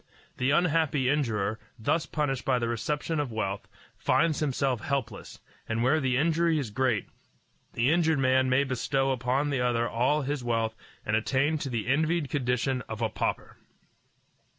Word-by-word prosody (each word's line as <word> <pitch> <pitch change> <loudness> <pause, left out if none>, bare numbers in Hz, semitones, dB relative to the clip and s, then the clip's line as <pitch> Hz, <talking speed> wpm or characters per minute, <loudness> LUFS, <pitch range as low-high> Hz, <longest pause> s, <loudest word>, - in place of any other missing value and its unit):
The 125 - +1
unhappy 155 -4 +2
injurer, 110 -7 0 0.2
thus 150 +8 0
punished 140 -4 -1
by 130 -2 +2
the 120 -1 -1
reception 150 +7 -2
of 145 -5 -2
wealth, 100 -2 -3 0.3
finds 165 -3 +1
himself 135 -4 0
helpless; 125 -7 -4 0.3
and 115 +1 0
where 140 +6 +3
the 130 -3 +1
injury 165 +2 +2
is 130 -8 -3
great, 125 -3 0 0.7
the 120 +5 +2
injured 160 -2 +3
man 130 -1 +3
may 130 +2 +3
bestow 135 +1 0
upon 130 +3 0
the 135 -3 0
other 120 -1 +1
all 130 +7 +1
his 140 -1 -2
wealth 115 -2 0 0.3
and 110 - +1
attain 135 +7 +1
to 140 - -4
the 115 -4 -2
envied 155 +3 +1
condition 125 -2 0
of 110 +1 -4
a 110 - +1
pauper. - - -3
130 Hz, 160 wpm, -28 LUFS, 120-150 Hz, 0.7 s, where